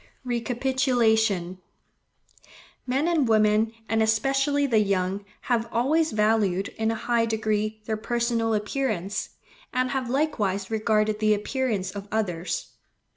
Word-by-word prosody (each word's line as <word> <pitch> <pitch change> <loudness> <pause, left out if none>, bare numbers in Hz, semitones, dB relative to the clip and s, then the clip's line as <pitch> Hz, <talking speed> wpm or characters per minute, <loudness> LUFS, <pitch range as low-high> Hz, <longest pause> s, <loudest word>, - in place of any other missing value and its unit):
Recapitulation.—Men 240 - -2
and 320 -7 +2
women, 215 0 +3 0.2
and 225 0 +1
especially 270 +6 +2
the 230 -5 +3
young, 195 -1 0 0.2
have 230 -2 0
always 310 +7 +2
valued, 210 -3 +1
in 220 0 -2
a 225 - 0
high 230 +1 +1
degree, 215 -1 -1
their 220 0 -2
personal 230 0 0
appearance; 210 -3 -2 0.4
and 255 0 0
have 260 -3 -2
likewise 215 -9 -1
regarded 215 -1 +1
the 215 -1 +3
appearance 210 -3 -2
of 200 0 -8
others. 185 -6 -2
220 Hz, 115 wpm, -25 LUFS, 210-250 Hz, 0.4 s, women